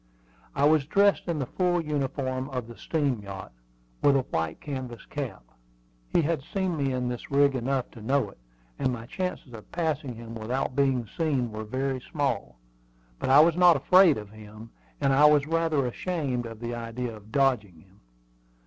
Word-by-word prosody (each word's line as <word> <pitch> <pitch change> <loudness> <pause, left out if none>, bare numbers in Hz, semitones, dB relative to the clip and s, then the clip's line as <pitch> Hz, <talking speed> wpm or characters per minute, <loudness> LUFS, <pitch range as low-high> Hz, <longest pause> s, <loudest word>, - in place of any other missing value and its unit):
I 140 - +3
was 150 -2 +4
dressed 200 +4 +3
in 170 -2 -1
the 140 - -1
full 175 +5 0
uniform 135 -3 -2
of 125 -4 -4
the 120 - -10
steam 140 -6 -1
yacht, 100 -1 -8 0.5
with 140 -1 +5
a 135 - +4
white 80 -7 -3
canvas 130 -5 -6
cap. 130 - -5 0.7
He 170 - +2
had 160 -1 0
seen 185 +3 -2
me 140 -3 0
in 125 -1 -1
this 125 -1 -5
rig 140 0 +4
enough 130 0 -1
to 115 - -12
know 125 -2 +1
it, - - -21 0.4
and 130 - +1
my 115 -2 -5
chances 180 -4 -4
of 110 -2 -11
passing 155 -7 -2
him 115 0 -9
without 125 +4 -2
being 135 -4 +2
seen 140 -8 0
were 110 0 -5
very 130 +3 -2
small. 135 - -2 0.6
But - - -2
I 140 +3 +8
was 165 +1 +4
not 180 -1 +6
afraid 180 +3 +6
of 105 -2 -8
him, 110 +1 -12 0.3
and 140 -1 +2
I 145 +3 +6
was 150 -1 +5
rather 160 -3 +1
ashamed 130 -3 -2
of 115 0 -10
the 120 0 -3
idea 120 0 -4
of 105 0 -15
dodging 110 - +1
him. 95 +1 -24
135 Hz, 185 wpm, -27 LUFS, 115-150 Hz, 0.7 s, I